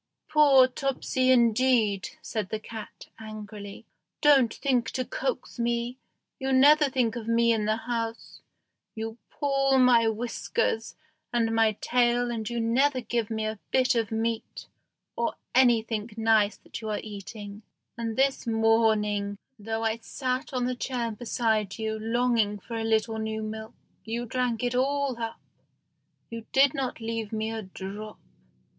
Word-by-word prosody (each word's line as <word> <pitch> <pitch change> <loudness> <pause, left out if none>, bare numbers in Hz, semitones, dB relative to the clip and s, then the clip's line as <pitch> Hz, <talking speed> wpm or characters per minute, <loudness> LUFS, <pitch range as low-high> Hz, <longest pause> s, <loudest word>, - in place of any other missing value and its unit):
"Poor 280 -4 +6
Topsy, 260 0 -1
indeed!" 235 -4 +3
said 215 -4 -3
the 220 - -3
cat, 220 0 -9
angrily; 210 -2 -9 0.3
"don't 275 -6 +5
think 245 -4 0
to 255 - -2
coax - - -4
me, 235 +2 -1 0.4
you 265 0 -1
never 290 +3 +6
think 250 -3 0
of 230 -2 -6
me 230 0 +3
in 215 -2 0
the 215 +1 +2
house, 230 -1 -4 0.5
you 225 +1 -5
pull 275 -2 +1
my 245 -3 +5
whiskers 225 0 -1 0.4
and 230 -2 +1
my 225 -1 +3
tail, 245 0 +2
and 220 -2 -3
you 240 0 -2
never 255 +4 +2
give 235 -2 -2
me 220 -1 -2
a 215 -1 -3
bit 260 -1 +3
of 230 -3 -1
meat, 225 0 -3 0.5
or - - -1 0.2
anything 230 -3 +3
nice 220 -2 +3
that - - -9
you 220 - -5
are 210 - -1
eating; 205 0 -8 0.3
and 230 -1 -3
this 270 -2 +1
morning, 220 -3 +2 0.2
though 225 +2 -3
I 225 0 0
sat 255 +4 -3
on 250 -2 -1
the 255 - 0
chair 245 -2 -2
beside 220 -2 -1
you, 220 -1 -3
longing 225 -2 +1
for 230 +4 -8
a 225 - -2
little 220 0 +1
new 220 0 -3
milk, 220 0 -6 0.3
you 235 +2 -3
drank 245 -1 -1
it 245 0 0
all 270 0 0
up 225 0 -4 0.9
you 230 -1 -7
did 270 -1 +5
not 260 -3 -3
leave 225 -1 -3
me 220 0 -2
a 225 -1 -4
drop. 200 +2 -8
230 Hz, 150 wpm, -27 LUFS, 220-250 Hz, 0.9 s, Poor